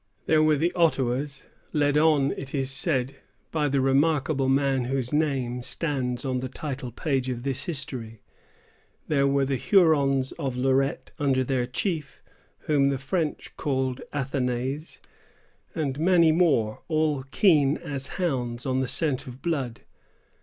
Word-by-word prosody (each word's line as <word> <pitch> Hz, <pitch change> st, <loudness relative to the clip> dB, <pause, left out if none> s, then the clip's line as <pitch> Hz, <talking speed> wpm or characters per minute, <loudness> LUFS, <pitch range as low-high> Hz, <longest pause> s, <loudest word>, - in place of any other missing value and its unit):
There 155 Hz, -1 st, +4 dB
were 155 Hz, 0 st, +4 dB
the 170 Hz, +4 st, 0 dB
Ottawas, 140 Hz, -4 st, 0 dB, 0.3 s
led 145 Hz, -1 st, +2 dB
on, 150 Hz, -3 st, +4 dB
it 135 Hz, +1 st, -6 dB
is 135 Hz, -1 st, 0 dB
said, 135 Hz, -2 st, 0 dB, 0.3 s
by 150 Hz, -2 st, 0 dB
the 135 Hz, 0 st, +1 dB
remarkable 135 Hz, 0 st, +2 dB
man 135 Hz, -2 st, +2 dB
whose 130 Hz, 0 st, -2 dB
name 135 Hz, -5 st, 0 dB
stands 130 Hz, -2 st, -2 dB
on 130 Hz, -1 st, -1 dB
the 130 Hz, 0 st, -4 dB
title 130 Hz, -2 st, -5 dB
page 130 Hz, 0 st, -1 dB
of 120 Hz, -1 st, -4 dB
this 135 Hz, 0 st, -1 dB
history; 125 Hz, -8 st, -5 dB, 0.8 s
there 140 Hz, -2 st, +2 dB
were 140 Hz, 0 st, +2 dB
the 135 Hz, 0 st, -1 dB
Hurons 140 Hz, -, +3 dB
of 130 Hz, -3 st, -3 dB
Lorette 135 Hz, +2 st, 0 dB
under 135 Hz, -3 st, +2 dB
their 125 Hz, -1 st, -1 dB
chief, 150 Hz, +1 st, -3 dB, 0.4 s
whom 140 Hz, -2 st, +2 dB
the 140 Hz, -, 0 dB
French 150 Hz, +4 st, -3 dB
called 130 Hz, -2 st, -1 dB
Athanase, 135 Hz, +1 st, -3 dB, 0.7 s
and 145 Hz, -4 st, -2 dB
many 170 Hz, -1 st, +5 dB
more, 150 Hz, -11 st, +2 dB
all 155 Hz, -3 st, +1 dB
keen 150 Hz, -4 st, +3 dB
as 140 Hz, -4 st, -4 dB
hounds 125 Hz, -9 st, -2 dB
on 130 Hz, -1 st, 0 dB
the 130 Hz, -, 0 dB
scent 140 Hz, -2 st, +3 dB
of 125 Hz, +1 st, -10 dB
blood. 135 Hz, -9 st, -2 dB
135 Hz, 145 wpm, -26 LUFS, 130-150 Hz, 0.8 s, many